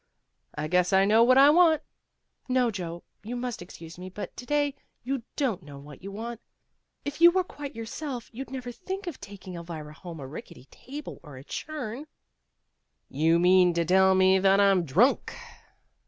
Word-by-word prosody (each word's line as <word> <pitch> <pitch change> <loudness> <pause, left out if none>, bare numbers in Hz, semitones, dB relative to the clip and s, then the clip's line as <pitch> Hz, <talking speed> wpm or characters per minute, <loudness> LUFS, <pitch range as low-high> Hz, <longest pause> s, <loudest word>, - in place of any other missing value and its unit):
"I 155 - -3
guess 180 +1 +2
I 190 0 +5
know 215 +3 +5
what 255 +2 +5
I 280 +2 +8
want." 320 -2 +5 0.7
"No, 250 -2 +2
Joe. 175 -4 -6 0.2
You 235 +4 -6
must 245 -3 -4
excuse 170 -1 -11
me, 185 +1 -7
but 205 +3 -7
to 245 - -9
day 290 -1 +1 0.3
you 265 +1 -2
don't 255 - -1
know 145 -1 -11
what 140 0 -12
you 195 +1 -7
want. 230 +3 -6 0.6
If 290 +3 -5
you 340 - +10
were 370 +1 +1
quite 290 -5 -9
yourself 240 +2 -6
you'd 265 +4 -7
never 255 -2 -6
think 380 +8 -6
of 345 -6 -7
taking 195 -2 -10
Elvira 165 -3 -7
home 170 0 -9
a 135 - -7
rickety 130 -2 -10
table 290 +3 -9
or 145 -5 -12
a 130 - -10
churn." 295 - -6 1.0
"You 160 +4 +2
mean 180 0 +5
to 170 0 +1
tell 190 +2 +5
me 190 0 +5
that 195 +1 +4
I'm 195 -3 +4
drunk." 195 - +2
200 Hz, 180 wpm, -27 LUFS, 175-270 Hz, 1.0 s, you